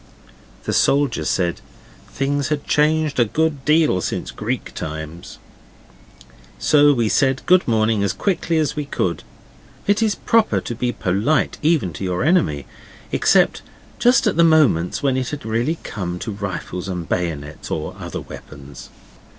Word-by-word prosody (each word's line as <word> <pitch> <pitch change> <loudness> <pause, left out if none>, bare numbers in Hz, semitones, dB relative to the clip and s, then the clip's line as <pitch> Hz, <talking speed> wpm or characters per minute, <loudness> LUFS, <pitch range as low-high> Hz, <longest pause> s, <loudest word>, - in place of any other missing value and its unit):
The - - -2
soldier 135 - +2
said 85 0 0 0.5
things 140 +1 -1
had 150 -2 -2
changed 150 -1 +1
a 120 - +5
good 150 +3 -1
deal 150 - +3
since - - -3
Greek - - -4
times. 80 +3 -7 1.2
So 145 -1 +5
we 120 -5 +1
said 135 +4 +1
good 185 0 +4
morning 110 -2 +2
as 100 - +1
quickly 170 -4 -1
as 155 -3 0
we 150 -1 -3
could: 90 -10 -2 0.6
it 205 +2 +2
is 215 -2 +2
proper 230 -2 +2
to - - -5
be 120 +1 -1
polite 105 +11 0
even 150 - +1
to 85 - -7
your 90 +2 -1
enemy, 130 - +2 0.5
except - - +3 0.4
just 245 +2 +4
at 210 -6 +1
the 170 - +6
moments 150 - +3
when 135 -2 +2
it 130 -1 -2
has 145 -4 -6
really 120 +9 0
come 90 -6 -4
to 110 - -5
rifles 95 -2 -5
and 90 -3 -4
bayonets 80 -4 -3
or - - -4
other - - -6
weapons. 70 -1 -11
125 Hz, 150 wpm, -20 LUFS, -, 1.2 s, the